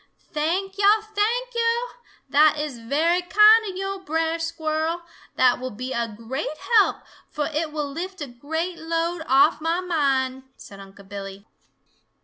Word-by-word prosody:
"Thank 375 +6 -1
yo'! 415 +2 +5
Thank 475 +4 0
yo'! 470 +1 0 0.4
That 305 +1 +4
is 295 -5 -4
very 315 +9 +1
kind 425 +5 +6
of 375 - -7
yo', 390 0 -3
Brer 325 -1 -1
Squirrel. 325 0 -2 0.3
That 250 -1 +3
will 255 +1 -4
be 255 +4 -6
a 235 0 -1
great 265 +7 -4 0.2
help, 405 - +1 0.3
fo' 300 - -3
it 305 +1 -2
will 300 -2 -3
lift 365 +5 -6
a 295 - -3
great 320 +8 -4
load 330 +1 -2
off 275 +5 +4
mah 330 +2 0
mind," 270 -7 0 0.2
said 200 - -12
Unc' 195 0 -14
Billy. 195 0 -8
320 Hz, 150 wpm, -23 LUFS, 265-365 Hz, 0.4 s, kind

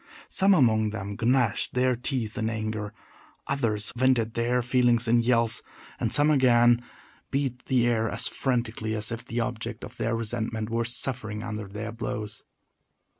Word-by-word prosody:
Some 195 0 +4
among 110 -7 +3
them 100 -1 -5
gnashed 120 -2 +1
their 125 0 +3
teeth 120 -3 -3
in 110 -3 -1
anger, 110 -1 -3 0.5
others 115 -6 -1
vented 120 -3 +2
their 120 +1 +1
feelings 120 -1 +2
in 120 +1 +4
yells, 115 -1 +3 0.4
and - - -1
some, 145 +1 +3
again, 120 -3 +5 0.5
beat 135 -3 -2
the 125 -3 +2
air 115 -2 +1
as - - 0
frantically 115 -4 -1
as 105 +1 -3
if 115 0 -5
the 120 -1 -2
object 115 -1 -4
of - - -9
their 115 +1 0
resentment 110 -1 -3
were 115 0 0
suffering 115 -3 -2
under 105 -3 -5
their 105 +3 -6
blows. 110 -2 -5
115 Hz, 155 wpm, -27 LUFS, 110-125 Hz, 0.5 s, again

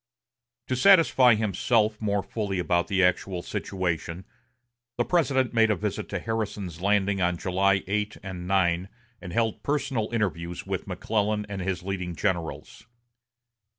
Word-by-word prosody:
To 130 - -1
satisfy 135 - +6
himself 110 +1 +1
more 100 -2 0
fully 100 -4 -3
about 85 -1 +1
the 95 -2 +2
actual 90 0 +1
situation, 90 -1 -3 0.7
the 120 - +1
President 135 -8 +1
made 115 -1 +4
a 105 - +3
visit 85 - -4
to - - -2
Harrison's 105 -6 -4
Landing 100 0 +2
on 90 -1 +1
July 95 +1 +1
8 105 +2 -2
and 90 -2 -6
9, 90 -1 +1 0.3
and 90 - -7
held 115 +3 0
personal 135 -7 -1
interviews 90 -6 -2
with - - -4
McClellan 105 -1 -1
and 100 -2 -5
his 90 -1 -2
leading 90 -2 -4
generals. 90 0 -3
100 Hz, 140 wpm, -26 LUFS, 90-110 Hz, 0.7 s, satisfy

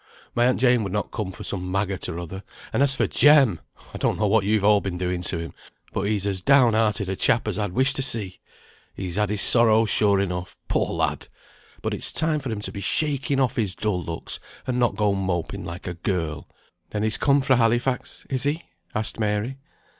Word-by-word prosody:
My 120 +1 +3
aunt 130 - +1
Jane 125 -2 +4
would 100 - -4
not 105 - -2
come 105 -5 -3
for - - -9
some 90 -1 -4
maggot 95 -1 -2
or 85 - -5
other; 90 +2 -6 0.3
and - - +1
as 140 -1 +4
for - - +2
Jem! 140 - +5 0.3
I - - -6
don't - - +1
know 105 - +1
what 105 0 +3
you've 105 0 +2
all 105 0 +5
been 95 -3 -4
doing 90 0 -2
to 85 - 0
him, 85 0 -6 0.4
but 100 - -1
he's 105 -2 0
as 95 -2 -1
down 130 0 +5
hearted 110 -2 +1
a 95 - -2
chap 110 +4 +1
as 105 -1 -2
I'd 105 -4 -2
wish 130 +5 +2
to 135 - -1
see. 110 -8 -4 0.6
He's 90 -3 -5
had 105 -1 +1
his 105 -1 0
sorrows 110 -2 +4
sure 100 -2 +3
enough, 90 -2 -3
poor - - +1
lad! - - -2 0.6
But - - -1
it's - - 0
time 155 0 +1
for 135 -3 -5
him 105 -2 -3
to - - -4
be 100 - -6
shaking 140 +1 0
off 130 -1 +1
his 100 -6 0
dull 105 -4 -1
looks, 85 0 -5 0.3
and 125 -1 -1
not 120 -5 +2
go 105 -1 +2
moping 95 -4 -2
like 85 +2 -7
a 90 - -3
girl." 85 -3 -3 0.4
"Then 105 - -2
he's 110 -1 +1
come 140 0 +4
fra 130 -1 +3
Halifax, 120 +2 0
is 130 -3 -1
he?" 145 +5 0 0.3
asked 110 +1 -1
Mary. 105 +5 -1
105 Hz, 220 wpm, -24 LUFS, 95-125 Hz, 0.6 s, Jem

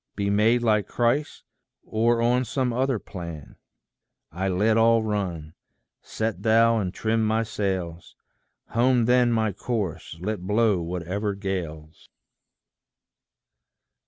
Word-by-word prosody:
Be 100 0 -1
made 115 +4 +3
like 105 -3 +2
Christ, 120 +5 -1 0.4
or 115 +1 +1
on 125 +2 +2
some 130 -1 -1
other 130 0 +1
plan? 85 -7 -9 0.7
I 95 +4 -2
let 105 +4 +2
all 115 0 +4
run: 90 -8 -3 0.5
set 110 0 -3
thou 115 +1 +4
and 95 -4 -2
trim 110 +3 0
my 110 +1 +1
sails; 95 -6 -4 0.5
Home 120 0 +2
then 125 0 +3
my 110 -2 +1
course, 90 -9 -4
let 105 +1 -3
blow 105 0 +2
whatever 90 +4 -3
gales. 85 -6 -6
110 Hz, 115 wpm, -25 LUFS, 90-115 Hz, 0.7 s, all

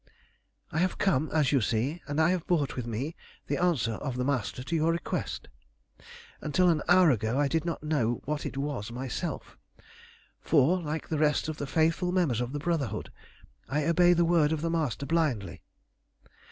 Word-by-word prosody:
"I 160 - -1
have 185 +1 +1
come, 155 -6 +1
as 155 -4 +2
you 140 -3 +3
see, 125 +10 -1
and 145 +1 -2
I 160 +2 +4
have 180 -3 -2
brought 155 -6 +1
with 125 -2 -4
me 130 +9 -3 0.3
the - - -2
answer 165 -11 +2
of 125 +3 -4
the 125 - -1
Master 125 -2 -1
to 165 - -3
your 160 +1 +2
request. 170 - -3 0.9
Until 180 +4 +2
an 160 -3 +2
hour 180 -2 +6
ago 110 +1 0
I 145 0 +3
did 160 +2 -1
not 165 -3 -3
know 125 -7 0
what 150 +1 -2
it - - -5
was 135 -6 -3
myself, 125 +1 -5 0.8
for, 165 +4 +3
like 155 0 -4
the 155 - -1
rest 150 0 +2
of 155 - -4
the 145 - -4
faithful 165 +4 +1
members 160 - +1
of 125 0 -3
the 145 - -3
Brotherhood, 145 - -2 0.6
I 145 +1 0
obey 175 +1 +5
the 170 0 +3
word 165 -3 +3
of 160 -2 -1
the 165 0 -1
Master 150 -5 -1
blindly. 130 - -1
150 Hz, 185 wpm, -28 LUFS, 130-165 Hz, 0.9 s, hour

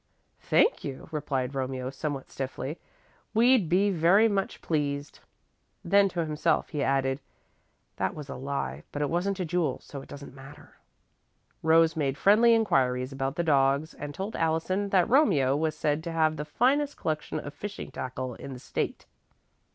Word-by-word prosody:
"Thank 460 - +2
you," 135 -2 -6
replied 135 -4 -2
Romeo, 130 -1 -3
somewhat 140 -1 -5
stiffly. 135 +3 -5 0.6
"We'd 235 -5 +4
be 195 +4 +3
very 185 +6 +5
much 200 -3 -1
pleased." 145 -2 -2 0.7
Then 200 +2 +4
to 170 -2 -2
himself, 150 0 0
he 150 -4 -3
added: 135 0 +1 0.8
"That - - -1
was 150 -2 -7
a - - -6
lie, 140 +2 -4
but 145 - -2
it 145 - -1
wasn't 185 +3 0
to 185 - -2
Jule, 170 0 0
so 140 - -9
it - - -14
doesn't 140 -2 -9
matter." 140 +2 -14 0.8
Rose 160 0 +4
made 140 -3 -1
friendly 230 +4 +5
inquiries 130 - +1
about 135 +1 -3
the 170 - 0
dogs 140 0 +2
and 145 0 -6
told 195 +8 -5
Allison 165 +5 0
that 185 -3 +3
Romeo 185 - +4
was 155 +1 -1
said 150 0 0
to 170 - -3
have 160 -1 +2
the 150 0 -5
finest 275 - +1
collection 155 -1 -2
of 145 - -8
fishing 205 +5 -7
tackle 130 0 -5
in 135 +4 -8
the 125 - -9
State. - - -3
155 Hz, 165 wpm, -28 LUFS, 135-185 Hz, 0.8 s, very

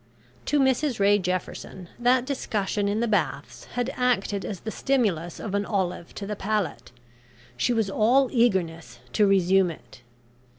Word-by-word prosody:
To 295 - +2
Mrs 265 -1 +1
Ray 205 +1 +4
Jefferson, 185 0 -4
that 245 +1 +3
discussion 210 -7 -1
in 210 +2 0
the 235 - +1
Baths 175 -8 -2
had 245 +1 -1
acted 220 -5 0
as 195 -4 -5
the 220 - -5
stimulus 200 -13 0
of 210 - -5
an 200 0 +1
olive 185 -4 -3
to 200 - -5
the 210 +1 -4
palate. 195 - -2 0.6
She 120 - +1
was 225 -3 +1
all 240 +7 +3
eagerness 185 - 0 0.2
to 210 - +4
resume 190 -1 +4
it. 160 -6 -12
205 Hz, 155 wpm, -25 LUFS, 185-240 Hz, 0.6 s, Ray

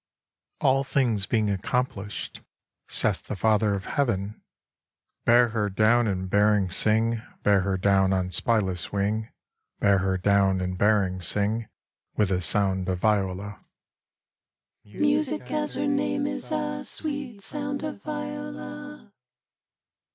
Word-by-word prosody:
VII - - -61
All 135 +1 +3
things 120 -8 0
being 110 -3 +1
accomplished, 100 - -3 0.5
saith - - +1
the - - -4
Father 105 0 +2
of 95 - -6
Heaven: 105 -7 -1 0.8
Bear 120 0 +5
her 110 -2 -1
down, 110 +4 +3
and 95 -2 -2
bearing, 105 -1 +2
sing, 110 +3 +3 0.2
Bear 100 -2 +4
her 95 0 -1
down 95 0 +3
on 90 -1 0
spyless 95 -2 0
wing, 105 +3 -1 0.5
Bear 100 -1 +4
her 95 0 0
down, 95 0 +2
and 90 0 -2
bearing, 95 -2 +2
sing, 105 +5 +1 0.5
With 105 -3 +2
a 90 -1 +1
sound 95 0 +1
of 90 - 0
viola. 100 0 -1
100 Hz, 100 wpm, -26 LUFS, 95-110 Hz, 0.8 s, Bear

